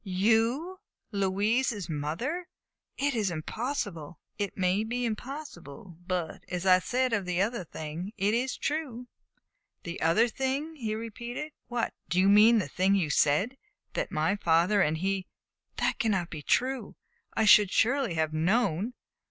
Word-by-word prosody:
"You 225 - +1 0.3
Louise's 205 +1 0
mother? 170 - -3 0.5
It 285 0 +1
is 215 -5 0
impossible!" 170 - -4 0.2
"It 200 -2 -3
may 185 +2 +2
be 245 +2 -2
impossible; 215 - -7
but, 180 -3 -3
as 180 +1 -3
I 185 -1 +6
said 255 +6 0
of 200 -4 0
the 180 0 -1
other 220 +1 0
thing, 160 +4 -6
it 200 +2 +1
is 250 +3 0
true." 275 -5 -3 0.8
"The 170 0 -6
other 185 +9 +4
thing?" 270 +6 -2
he 220 -7 -3
repeated. 235 +6 -6 0.2
"What 240 -1 -2 0.2
do 180 - +1
you 190 +1 +5
mean 215 +3 +7
the 205 - 0
thing 190 +7 +2
you 170 -7 +1
said 190 - +2 0.4
that - - -2
my 160 +6 +1
father 175 +3 +3
and 155 -2 +2
he 190 +2 -1 0.5
That - - 0
cannot 195 -6 0
be 155 - -6
true. 255 - 0 0.4
I 220 - +2
should 210 -2 +7
surely 245 -3 +2
have 160 -1 0
known!" 195 +5 +1
205 Hz, 150 wpm, -29 LUFS, 175-245 Hz, 0.8 s, mean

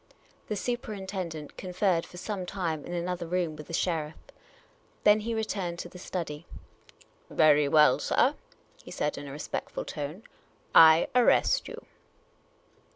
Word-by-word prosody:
The 210 - -2
superinten 205 -6 -4
dent 155 -2 -9
conferred 185 -2 0
for 180 - -13
some 185 -1 -4
time 165 -6 -3
in 175 - -6
an 170 0 -2
other 180 -2 -3
room 175 -2 -1
with 150 -1 -10
the 170 - -9
sheriff. 160 -3 -1 0.9
Then 210 +1 +6
he 225 +2 -3
returned 195 -6 -3
to 175 - -6
the 180 - -12
study. 170 -4 -5 0.8
"Very 150 -2 +4
well, 150 -2 +5
sir," - - +2 0.5
he - - -12
said, 150 - -2
in 145 - -8
a - - -7
respect 145 +2 -5
ful - - -5
tone, 150 +7 -6 0.2
' - - -35
' - - -35 0.2
I 160 +2 +2
arrest 250 - +3
you." 470 0 -9
175 Hz, 160 wpm, -28 LUFS, 155-200 Hz, 0.9 s, Then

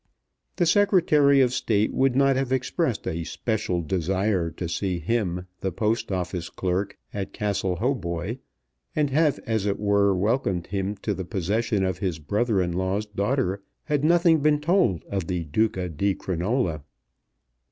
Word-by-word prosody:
The 175 - +2
Secretary 165 -8 +4
of 125 -1 +3
State 110 -5 +1
would 135 -1 +2
not 135 0 +4
have 130 -1 -1
expressed 130 - -1
a 85 +1 -2
special 100 -2 -2
desire 95 +1 0
to 85 +1 -5
see 90 +2 -1
him, 90 -1 -1
the 95 - -2
Post 110 +4 -1
Office 90 -2 -3
clerk, 95 +2 -2 0.2
at 100 -2 -4
Castle 100 -3 -1
Hautboy, 100 -1 -2 0.6
and 150 -2 +1
have, 150 +1 +3
as 110 -4 0
it 100 - 0
were, 100 -1 +3
welcomed 95 -3 0
him 100 +1 -2
to 105 - 0
the 95 - -4
possession 100 +4 -1
of 95 -1 -1
his 90 -4 -1
brother 100 +6 0
in 90 - -2
law's 95 +4 -1
daughter, 100 -1 -1 0.2
had 150 -2 -1
nothing 170 0 +4
been 150 0 +3
told 160 - +2
of 95 -4 -3
the 90 -2 -1
Duca 95 +3 0
di 95 +4 0
Crinola. 90 - -1
100 Hz, 155 wpm, -25 LUFS, 90-130 Hz, 0.6 s, Secretary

